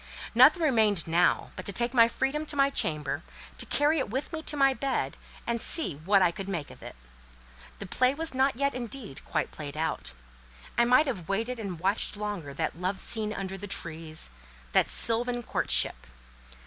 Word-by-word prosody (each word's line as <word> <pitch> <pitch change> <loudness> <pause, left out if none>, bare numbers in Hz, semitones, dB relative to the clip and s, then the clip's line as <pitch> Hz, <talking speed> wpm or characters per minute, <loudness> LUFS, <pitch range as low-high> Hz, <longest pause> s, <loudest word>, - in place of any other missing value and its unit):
Nothing 275 +9 +6
remained 220 - +3
now 170 +2 +2
but 185 - -7
to - - -2
take 235 +5 -1
my 230 -2 +6
freedom 270 +6 -2
to 295 - -2
my 275 0 +3
chamber, 150 - -1 0.4
to - - -3
carry 295 +2 +2
it 265 - -2
with 265 +9 -4
me 320 - -3
to 295 - -3
my 275 -1 +4
bed 270 0 -2 0.3
and 235 -1 -1
see 315 - +1
what 190 +5 +3
I 175 - +3
could 195 +1 -7
make 165 -7 -4
of - - -15
it. - - -9 0.8
The 200 - -7
play 255 +7 +1
was 320 0 0
not 265 0 +2
yet, 280 +2 0
indeed, 240 - -6
quite - - -2
played 150 -1 -8
out. 155 - -2 0.6
I 235 - +4
might 255 +6 +5
have 200 - -4
waited 230 +5 -1
and 190 -6 -5
watched 195 +3 0
longer 205 -8 -4
that 145 - -3
love 190 +2 -1
scene 215 -2 +5
under 195 -2 -5
the 205 - -7
trees, 160 - -5 0.4
that - - +3
sylvan 240 +1 0
courtship. - - +1
220 Hz, 185 wpm, -28 LUFS, 185-265 Hz, 0.8 s, Nothing